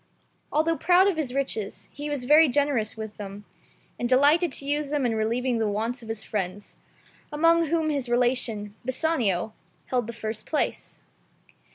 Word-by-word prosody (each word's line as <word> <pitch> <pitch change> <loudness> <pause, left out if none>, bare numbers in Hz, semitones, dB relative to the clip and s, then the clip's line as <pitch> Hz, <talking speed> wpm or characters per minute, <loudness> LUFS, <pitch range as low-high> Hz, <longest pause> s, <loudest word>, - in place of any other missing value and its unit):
Although 320 +2 +1
proud 365 +2 +4
of 395 - +1
his 290 -6 -2
riches, 255 -6 -3
he 290 +1 -6
was 285 -4 -3
very 305 +4 +7
generous 260 -6 0
with 220 -1 -7
them, 200 0 -8 0.5
and 240 - -1
delighted 290 +6 +4
to 275 - -4
use 290 0 -1
them 290 -3 0
in 235 - +1
relieving 230 +3 0
the 220 -1 +1
wants 225 +5 -2
of 225 - -11
his 220 -1 -4
friends, 200 -1 -4 0.5
among 330 +2 +3
whom 320 0 +1
his 275 -4 -2
relation, 240 -4 0
Bassanio, 245 - 0 0.4
held 245 -3 0
the 235 - -5
first 215 -1 -6
place. 305 - -2
250 Hz, 165 wpm, -26 LUFS, 220-295 Hz, 0.5 s, very